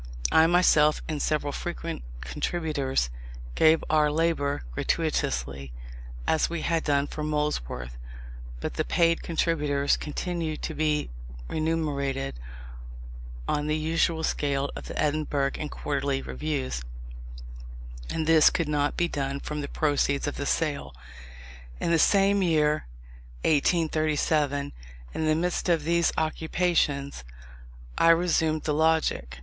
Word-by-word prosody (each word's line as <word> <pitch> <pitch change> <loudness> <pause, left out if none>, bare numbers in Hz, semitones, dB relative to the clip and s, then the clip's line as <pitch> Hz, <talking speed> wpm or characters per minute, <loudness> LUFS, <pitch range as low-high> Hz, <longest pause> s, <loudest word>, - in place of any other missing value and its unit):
I 160 0 +6
myself 160 -4 +4
and 150 -2 -3
several 145 -2 0
frequent - - -5 0.2
contributors 135 - -1 0.4
gave 160 - +4
our 150 -1 +3
labour 150 - 0
gratuitously, 65 +2 -1 0.5
as 160 - +2
we 170 -1 -3
had 165 -1 0
done 140 -1 +2
for 150 - -6
Molesworth; 105 - -2 0.6
but - - -3
the - - -1
paid 165 -1 +2
contributors 150 -4 +1
continued 160 0 -4
to - - -3
be 150 - 0 0.4
remunerated 140 - -2 1.1
on 150 0 0
the 155 0 +1
usual 160 +1 0
scale 140 -2 0
of - - -8
the - - -5
Edinburgh 145 -2 0
and 150 - -4
Quarterly 140 -2 -2
Reviews; 140 - -3 1.3
and 160 - -2
this 160 -1 +6
could 170 -3 -1
not 145 -1 0
be 175 - +2
done 140 -3 -3
from 150 +1 -4
the 145 - -4
proceeds 145 -2 +1
of 145 - -3
the 140 - -3
sale. 140 - -1 0.8
In - - 0
the 165 - +4
same 200 +3 +4
year, 155 - +2 0.6
1837, 155 -2 +1 0.4
and - - -2
in 155 - +1
the 155 - +4
midst 175 +2 -1
of 165 -3 +2
these 170 +1 +2
occupations, 155 - 0 0.8
I 165 - +5
resumed 160 -2 +3
the 150 - 0
Logic. 160 - +1
150 Hz, 125 wpm, -27 LUFS, 140-160 Hz, 1.3 s, I